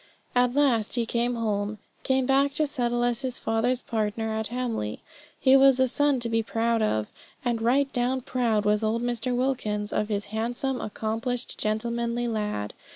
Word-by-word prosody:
At 245 0 +2
last 245 -8 +2
he 235 -2 +1
came 240 +2 0
home 210 -2 -1 0.2
came 265 -1 +1
back 275 +1 +3
to 310 - +2
settle 240 -4 0
as 240 0 +1
his 255 -2 -3
father's 235 +3 0
partner 220 0 -2
at 220 0 -2
Hamley. 235 - -3 0.4
He 265 0 +5
was 270 -1 +6
a 260 - +4
son 285 +1 +2
to 235 - -1
be 225 0 +1
proud 225 +1 0
of, 110 - +1 0.4
and 235 -2 0
right 270 +4 +2
down 250 +1 0
proud 230 -4 0
was 210 +1 +3
old 225 +2 0
Mr. 245 +1 -1
Wilkins 215 -5 -1
of 210 - 0
his 205 -1 -1
handsome, 240 +4 -2
accomplished, 225 +3 -3
gentlemanly 235 +2 -1
lad. 210 - -2
235 Hz, 170 wpm, -26 LUFS, 220-255 Hz, 0.4 s, was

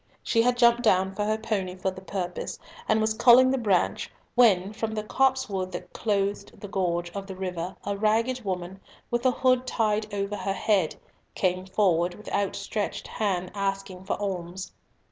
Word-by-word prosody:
She 230 - +3
had 245 +1 +2
jumped 235 0 +5
down 190 -4 +3
from 205 +1 -2
her 215 0 +1
pony 200 -5 -2
for 190 +1 -1
the 185 0 -10
purpose, 185 -2 -4 0.3
and 220 - +4
was 220 0 +1
culling 245 +3 +7
the 270 - +1
branch, 200 -6 +1 0.2
when 205 -5 +4
from 220 0 -3
the 215 - -2
copsewood 240 -6 0
that 175 - -7
clothed 200 -1 -1
the 205 - -7
gorge 175 -3 -1
of 195 +1 -6
the 190 - -7
river 180 -1 -4
a 200 - -1
ragged 225 +4 +1
woman, 185 -1 -4 0.3
with 240 +2 +2
a - - +5
hood 255 0 +2
tied 215 -2 0
over 200 0 -2
her 195 - -2
head, 195 -5 +1 0.4
came 185 0 0
forward 180 -3 +2
with 210 - -10
outstretched 200 +1 -2
hand 185 -4 -2
asking 195 -2 -3
for 195 - -1
alms. 185 -2 -4
200 Hz, 175 wpm, -26 LUFS, 185-220 Hz, 0.4 s, culling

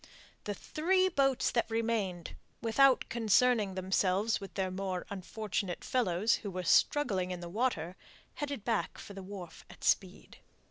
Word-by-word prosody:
The 205 - -3
three 370 - +1
boats 270 -6 +2
that 235 -1 0
remained, 225 -6 -2 0.2
without 255 +3 +4
concerning 225 -2 +2
themselves 190 +3 +1
with 195 - -9
their 190 -1 -1
more 185 -1 -3
unfortunate 195 -1 -4
fellows, 215 -3 +1
who 205 - -6
were 185 -1 -4
struggling 195 -3 +3
in 180 -1 -4
the 175 - -7
water, 185 -5 -1 0.4
headed 285 -7 -5
back 225 -3 -1
for 200 - -10
the 195 - -8
wharf 185 -3 -9
at - - -14
speed. - - 0
205 Hz, 145 wpm, -32 LUFS, 185-240 Hz, 0.4 s, without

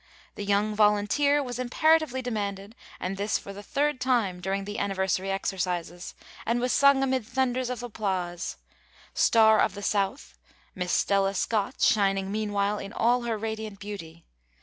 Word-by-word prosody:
'The - - -6
Young 205 +1 +1
Volunteer' 215 +8 +3
was 245 -2 -5
imperatively 270 +1 +2
demanded, 205 -3 -4 0.2
and 190 +2 -3
this 205 +2 0
for 200 - -9
the 200 - -9
third 285 +5 -1
time 235 -8 +1
during 195 +2 -2
the 205 +1 -5
anniversary 190 -1 -1
exercises, 180 -3 -3 0.3
and 235 +2 0
was 250 +1 0
sung 280 -1 +5
amid 260 -2 0
thunders 255 +1 -1
of 250 -1 -4
applause, 190 -6 -3 0.6
'Star 220 -1 +5
of 200 - +2
the 205 - -7
South,' 190 - -2 0.3
Miss 180 -1 -3
Stella 195 0 +2
Scott, 220 +5 -1
shining 195 -2 +2
meanwhile 205 -1 -1
in 200 - -7
all 245 +1 +2
her 230 -2 -1
radiant 220 -2 -5
beauty. 170 -6 -8
205 Hz, 150 wpm, -27 LUFS, 195-245 Hz, 0.6 s, sung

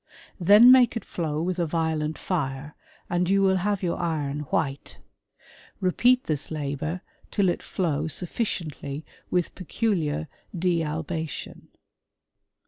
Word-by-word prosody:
Then 205 +7 +8
make 250 -3 +6
it - - -6
flow 155 -2 -2
with 180 +1 -2
a 170 - +1
violent 160 -1 -1
fire, 145 -4 -3 0.3
and 175 0 0
you 195 0 +4
will 190 -1 +4
have 200 +1 0
•your 175 -3 -1
iron 150 -4 -1
white.. 140 -3 -2 0.8
Repeat 245 +7 +3
this 150 -2 -2
labour 155 +3 -3 0.3
till 200 -3 +2
it 175 - -1
flow 155 -5 -1
suffir 180 +8 -2 0.2
ciently 140 +1 -7 0.3
with 180 -2 0
peculiar 165 -6 -1 0.3
dealbation. 160 -2 -2
165 Hz, 125 wpm, -26 LUFS, 150-185 Hz, 0.8 s, Then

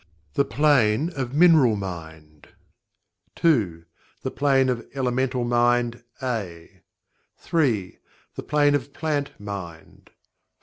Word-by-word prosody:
The 140 - +2
Plane 145 0 +2
of 130 -1 -4
Mineral 155 -8 +5
Mind 80 -6 -8 0.9
2. 100 - +1 0.4
The - - -3
Plane 135 -2 +2
of 120 -2 -2
Elemental 130 -1 0
Mind 120 0 +1 0.2
(A) 100 -10 -5 0.6
3. 120 - -1 0.3
The - - -6
Plane 145 -1 +2
of 140 0 -2
Plant 145 -5 -3
Mind 95 -6 -9
4. - - -36
120 Hz, 105 wpm, -24 LUFS, 100-140 Hz, 0.9 s, Mineral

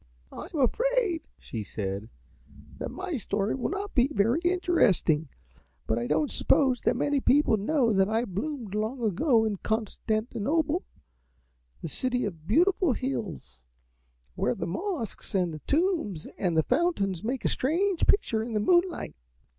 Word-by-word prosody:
"I - - -7
am 315 - -3
afraid," 450 - +1 0.2
she 110 -3 -6
said, 100 +1 -4 0.7
"that - - -3
my 370 -5 -4
story 200 -1 -1
will 260 - -2
not 400 +2 -4
be 255 +1 +3
very 235 +3 +2
interesting, 340 - +2 0.6
but 110 - 0
I 120 - -2
don't 150 +1 +1
suppose 260 -4 +3
that 240 - +2
many 285 +3 +1
people 275 -3 +4
know 230 +2 +1
that 195 0 +3
I 225 +2 +1
bloomed 220 - -4
long 220 +4 -2
ago 225 - +3
in 210 -2 -1
Constantinople, 230 - -1 1.0
the - - -2
city 250 - -1
of 165 -6 -7
beautiful 350 - +3
hills, 225 - -5 0.7
where - - 0
the - - -3
mosques 285 - -4
and 180 -3 +1
the 155 - -6
tombs 310 - 0
and 175 -4 0
the 160 - +4
fountains 245 - 0
make 250 +3 -3
a - - +5
strange 350 +7 +1
picture 230 - +2
in 230 +1 -4
the 215 - +1
moonlight. 350 - +2
240 Hz, 150 wpm, -28 LUFS, 195-320 Hz, 1.0 s, a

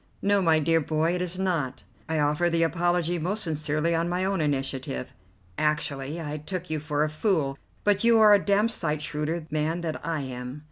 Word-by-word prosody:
"No, 200 0 +3
my 165 -3 +4
dear 165 +2 +2
boy, 155 +3 0
it 180 - -2
is 180 0 -3
not. 170 -9 -1 0.3
I 160 - 0
offer 150 +3 +2
the 165 0 +2
apology 175 +1 +1
most 190 +7 0
sincerely 155 0 0
on 165 +1 0
my 180 +1 0
own 195 -3 0
initiative. 135 - -2 0.5
Actually 150 0 -1
I 150 -2 -4
took 175 +2 -5
you 155 - 0
for 150 0 -1
a - - +1
fool, 155 -3 0 0.3
but 205 0 +2
you 230 0 +6
are 215 -1 +7
a 200 - +4
damned 210 +3 +2
sight 155 -7 -2
shrewder 155 +1 -3
man 155 +3 -1
than 160 -2 -3
I 160 -1 -3
am. 125 +1 -6
160 Hz, 195 wpm, -26 LUFS, 150-180 Hz, 0.5 s, are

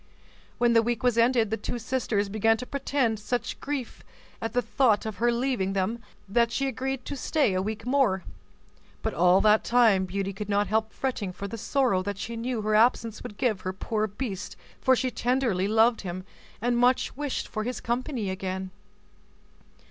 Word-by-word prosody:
When 240 -1 +3
the 230 - +6
week 235 0 -2
was 245 -2 +3
ended, 230 -2 +3
the 220 - 0
two 245 - -4
sisters 225 -3 -1
began 220 +2 +2
to 250 - -6
pretend 265 -5 0
such 240 +3 -3
grief 275 -4 -5 0.4
at 225 -1 -3
the 245 - +2
thought 230 -2 +2
of 215 -3 -4
her 240 +3 +2
leaving 235 -6 0
them 195 +5 -1 0.3
that 235 +4 +2
she 275 - 0
agreed 265 0 -3
to 285 - -4
stay 280 - +1
a 185 - +1
week 215 +2 -4
more; 250 -8 +2 0.8
but - - -1
all 180 +3 +4
that 215 0 +4
time 225 -6 +4
Beauty 195 +1 -3
could 210 +2 -6
not 205 0 +2
help 220 +2 0
fretting 240 -8 -3
for 200 +2 -6
the 200 - -6
sorrow 240 -4 +1
that 200 +1 -4
she 230 +3 -5
knew 230 -1 -3
her 215 0 0
absence 225 0 +3
would 205 - -8
give 220 -7 0
her 185 - -3
poor 215 +3 -1
beast 205 -2 -5 0.2
for 260 - +4
she 255 +1 -1
tenderly 240 -7 0
loved 225 +2 +3
him, 185 -1 -5 0.4
and 240 0 +2
much 250 +1 +2
wished 290 -1 -3
for 215 - -3
his 250 +2 -3
company 240 -3 -2
again. 190 0 -4
225 Hz, 185 wpm, -27 LUFS, 200-245 Hz, 0.8 s, the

